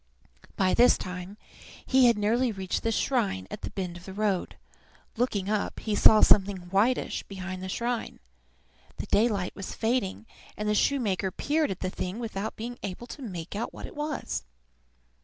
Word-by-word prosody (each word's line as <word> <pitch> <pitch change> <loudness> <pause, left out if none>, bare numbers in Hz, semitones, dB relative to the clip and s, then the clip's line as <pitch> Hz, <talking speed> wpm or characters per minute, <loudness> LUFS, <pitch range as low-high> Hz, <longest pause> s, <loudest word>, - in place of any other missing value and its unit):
By 190 -1 +2
this 245 +1 +6
time 180 +2 -6 0.5
he 260 -1 +5
had 235 -2 +4
nearly 230 +4 +2
reached 190 -3 -2
the 230 - 0
shrine 215 - 0
at - - -6
the - - -4
bend 180 -3 -4
of 175 - -13
the 190 - -8
road. 205 -3 0 0.6
Looking 220 -5 0
up, 210 0 -1
he 215 - -2
saw 215 +1 +7
something 190 -3 +4
whitish 220 +6 +2
behind 185 -1 -6
the 190 - -5
shrine. 235 +3 -2 0.8
The - - -4
daylight 205 -4 +1
was 195 - -6
fading, 225 -3 -1 0.3
and 210 - -2
the 210 - +3
shoemaker 210 -6 +1
peered 300 - 0
at 190 - -4
the 185 - -1
thing 185 +2 -4
without 220 -3 -4
being 240 +2 -6
able 200 +4 -5
to 280 - -9
make 185 -7 -6
out 220 - -3
what - - -7
it - - -11
was. 295 -1 -3
210 Hz, 175 wpm, -28 LUFS, 190-235 Hz, 0.8 s, saw